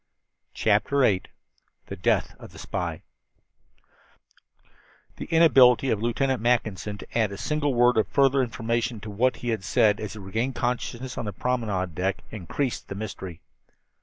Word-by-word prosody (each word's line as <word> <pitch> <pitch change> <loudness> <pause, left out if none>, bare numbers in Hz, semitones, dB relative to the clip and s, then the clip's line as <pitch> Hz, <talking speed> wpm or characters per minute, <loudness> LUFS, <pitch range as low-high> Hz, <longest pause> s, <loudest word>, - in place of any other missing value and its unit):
CHAPTER 110 +6 +2
VIII 100 -7 +3 0.6
THE 100 - -7
DEATH 90 - 0
OF - - -12
THE - - -13
SPY - - -4 2.1
The - - -5
inability 135 -6 +5
of 105 - 0
Lieutenant 125 +1 0
Mackinson 110 -4 0
to - - -11
add 110 -3 +2
a 100 - -6
single 145 +1 -1
word 120 0 +4
of 110 - +2
further 135 -1 +3
information 115 -1 -2
to 110 - -7
what 120 +4 +1
he 120 - -5
had 110 -4 -1
said 105 +4 +3
as 105 - -5
he - - -10
regained 110 +6 -3
consciousness 125 +1 -3
on - - -3
the 105 - -3
promenade 105 -8 -2
deck 95 +4 -2
increased 115 - -3
the 100 - -6
mystery. 95 -4 -7
115 Hz, 155 wpm, -25 LUFS, 105-125 Hz, 2.1 s, inability